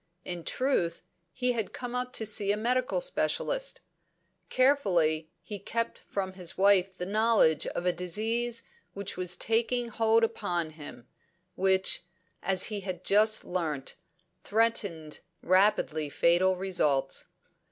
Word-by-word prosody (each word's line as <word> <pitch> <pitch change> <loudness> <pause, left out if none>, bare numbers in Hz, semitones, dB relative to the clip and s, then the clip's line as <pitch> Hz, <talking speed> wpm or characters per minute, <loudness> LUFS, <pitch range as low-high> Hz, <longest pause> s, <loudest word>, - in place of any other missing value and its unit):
In 175 -2 -4
truth, 180 -11 -1 0.3
he 250 -1 0
had 225 -5 -3
come 245 -1 -6
up 250 0 -2
to 220 - 0
see 205 -1 +1
a 205 - 0
medical 250 - 0
specialist. - - -1 0.7
Carefully 175 - +2
he 205 -2 -6
kept 230 +4 -3
from 190 -2 -4
his 180 -3 -5
wife 195 -1 +4
the 180 - -3
knowledge 205 -6 +3
of 175 - -4
a 180 - +3
disease 225 +7 -1 0.3
which 200 -1 -5
was 180 -1 -1
taking 235 +3 +1
hold 225 0 +3
upon 175 -8 -1
him, 150 -6 -11 0.5
which 190 -1 +2 0.4
as 190 0 +1
he 210 -2 -2
had 185 -2 -6
just 215 +3 +4
learnt 155 -7 -3 0.5
threatened 200 -8 0 0.2
rapidly 185 -5 +2
fatal 175 +5 +3
results. 180 -7 0
195 Hz, 130 wpm, -29 LUFS, 175-230 Hz, 0.7 s, wife